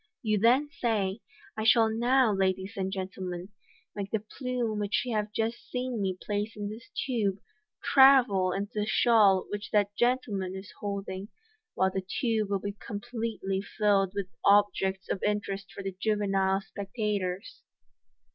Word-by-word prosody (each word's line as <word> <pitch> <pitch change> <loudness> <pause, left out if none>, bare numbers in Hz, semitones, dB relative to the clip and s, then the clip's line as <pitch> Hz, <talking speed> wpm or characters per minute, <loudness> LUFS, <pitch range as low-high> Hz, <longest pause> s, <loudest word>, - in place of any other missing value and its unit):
You 215 -2 +1
then 250 +7 +4
say, 220 -6 -1 0.2
" - - -24
I 220 - -1
shall 225 0 +6
now, 240 +1 +3
ladies 190 +1 0
and 190 -1 -2
gentlemen, 185 -1 -5 0.5
make 200 -1 -4
the 220 - +1
plume 235 0 -3
which 205 0 0
you 245 - -2
have 210 0 -1
just 225 +2 -3
seen 250 -3 -2
me 190 -2 -1
place 210 +1 -3
in 205 -1 -4
this 220 +2 -10 0.2
tube 215 -7 0 0.5
travel 255 -9 +6
into 200 +2 -3
the 210 - -1
shawl 205 -3 +4
which 205 0 -5
that 205 -1 +1
gentleman 215 -7 0
is 190 +1 -8
hold 200 -1 -4
ing, 190 +2 -5 0.5
while 190 0 +2
the 190 - -2
tube 215 +2 -1
will 200 - +1
be 200 +1 -4
completely 205 -2 -3
filled 200 -2 +1
with 200 -1 -1 0.2
objects 195 -2 +3
of 190 - -2
interest 200 -2 -2
for 195 - -8
the 195 - -3
juvenile 195 -2 +1
spectators." 200 -1 -4
205 Hz, 155 wpm, -29 LUFS, 195-225 Hz, 0.5 s, shall